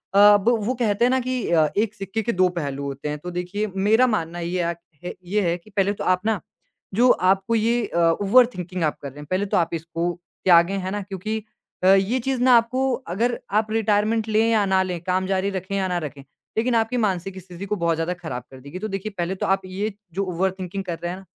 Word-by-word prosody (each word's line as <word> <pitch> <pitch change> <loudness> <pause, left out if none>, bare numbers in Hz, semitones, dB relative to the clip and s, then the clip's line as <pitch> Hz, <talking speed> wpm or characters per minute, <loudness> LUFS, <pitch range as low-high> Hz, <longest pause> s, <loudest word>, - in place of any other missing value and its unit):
अ, 205 +1 +8
ब 205 +4 +1 0.2
वो 255 - +1
कहते 230 -1 +1
हैं - - +3
ना 260 - +3
कि 255 0 -2 0.2
अ, 160 -2 +4
एक 210 0 +1
सिक्के 200 +2 -3
के 235 - 0
दो 185 -3 +3
पहलू 140 -3 -3
होते 140 +1 -4
हैं, 150 - -3
तो 180 +4 -7
देखिए 180 +4 -3
मेरा 215 +6 +4
मानना 175 -7 -2
ये 175 +2 -2
अ 170 0 0
क - - -18 0.3
है 180 - -4
ये 205 +4 0
है 170 +1 +1
कि 180 +5 -20
पहले 200 -1 +1
तो - - -6
आप 185 0 +2
ना, 220 -3 +1 0.5
जो 240 +6 +4
आपको 195 +4 +2
ये 230 +1 +1
अ, - - -4 0.2
ओवरथिंकिंग 195 -5 +3
आप 155 - 0
कर 140 - -5
रहे 140 +2 -13
हैं, 150 - -8
पहले 190 +2 +1
तो 195 - 0
आप 170 -1 +1
इसको 165 +1 -2 0.4
त्यागें, 175 +1 +5
हैं 185 0 -4
ना? 205 +1 -2
क्योंकि 200 +3 -4 0.5
अ, 185 - +4
ये 195 +6 +2
चीज़ 260 0 -2
ना 255 -1 +7
आपको 255 +3 +1 0.2
अगर 240 +4 0 0.2
आप 215 0 -4
रिटायरमेंट 220 0 +1
लें 220 +1 +3
या 215 -3 +3
ना 190 -1 +3
लें, 180 -2 -3
काम 185 +1 0
जारी 195 +1 0
रखें 190 +1 -4
या 190 -1 0
ना 180 - -1
रखें, 145 -1 -8 0.4
लेकिन 235 +2 +2
आपकी 225 +2 +1
मानसिक 190 -4 -1
स्थिति 180 +1 -9
को 210 +1 -1
बहुत 170 -3 +1
ज़्यादा 165 +2 -1
खराब 125 -6 -4
कर 130 - -11
देगी। 140 +7 -8
तो 215 - -3
देखिए 195 +1 -4
पहले 175 +2 -1
तो - - -3
आप 195 0 +2
ये 195 +3 -3 0.2
जो 195 +3 -1
ओवरथिंकिंग 190 +1 -2
कर 170 -2 -4
रहे 175 - -2
हैं 185 - -6
ना, 195 - -15
195 Hz, 245 wpm, -23 LUFS, 175-215 Hz, 0.5 s, अ